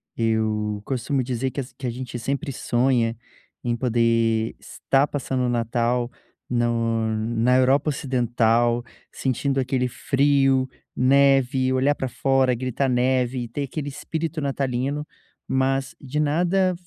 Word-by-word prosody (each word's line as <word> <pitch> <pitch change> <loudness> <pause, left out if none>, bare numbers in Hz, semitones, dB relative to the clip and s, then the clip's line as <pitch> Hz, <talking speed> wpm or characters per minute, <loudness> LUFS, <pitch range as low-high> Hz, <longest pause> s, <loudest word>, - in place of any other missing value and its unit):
Eu 110 -2 0
costumo 130 +1 -1
dizer, 125 +1 -2
que 135 - -6
as 130 -2 -6
que 130 - -5
a - - 0
gente 125 0 -5
sempre 140 +5 -2
sonha 120 -2 +1 0.5
em 120 -1 0
poder 115 -2 +1
estar 135 +1 0
passando 135 -3 -2
o - - 0
Natal 120 +1 0 0.4
no 115 -2 +1
na 115 +3 +2
Europa 135 +4 +3
Ocidental, 120 -4 +1 0.3
sentindo 135 +1 -1
aquele 130 -1 0
frio, 135 0 +2 0.3
neve, 135 -1 +3
olhar 135 +3 +3
pra 135 - -3
fora 135 0 +2
e - - -1
gritar: 130 +2 -1
"Neve" 125 0 +1
e - - -6
ter 140 +5 -3
aquele 145 +1 -4
espírito 160 +3 -4
natalino, 140 +1 -1 0.4
mas 135 +1 0
de 140 +2 -3
nada 180 +5 +2
130 Hz, 135 wpm, -23 LUFS, 120-135 Hz, 0.5 s, Europa